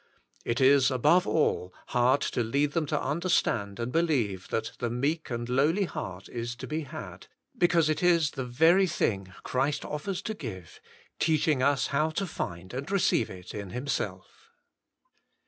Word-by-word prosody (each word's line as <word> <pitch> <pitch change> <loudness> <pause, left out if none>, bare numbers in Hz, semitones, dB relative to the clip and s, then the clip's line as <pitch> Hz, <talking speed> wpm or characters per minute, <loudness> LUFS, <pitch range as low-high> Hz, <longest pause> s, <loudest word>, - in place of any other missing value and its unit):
It 115 0 -1
is 135 0 +5
above 150 +7 +3
all 95 - +1 0.2
hard 125 +3 +3
to - - -1
lead 140 +6 +1
them 160 -2 -1
to 150 0 0
understand 135 - 0
and 120 +1 -2
believe 125 - 0
that 110 0 -2
the 120 - -1
meek 140 +7 -1
and 120 -1 -3
lowly 145 +10 +2
heart 95 - -6
is 120 0 -5
to - - -7
be 155 +1 -2
had, 140 - -9 0.3
because 170 -2 +3
it 155 - 0
is 170 -4 +3
the 135 - -4
very 160 +10 +4
thing 100 - -1
Christ 135 +3 -1
offers 175 +6 -4
to 220 - -3
give, 100 - -8 0.4
teaching 155 -3 +2
us 135 -1 +3
how 150 +3 +2
to 195 +5 -2
find 95 - -6
and 135 +6 -5
receive 195 - +2
it 90 -1 -10
in 100 -2 -6
Himself. 125 +7 -4
140 Hz, 165 wpm, -28 LUFS, 115-160 Hz, 0.4 s, is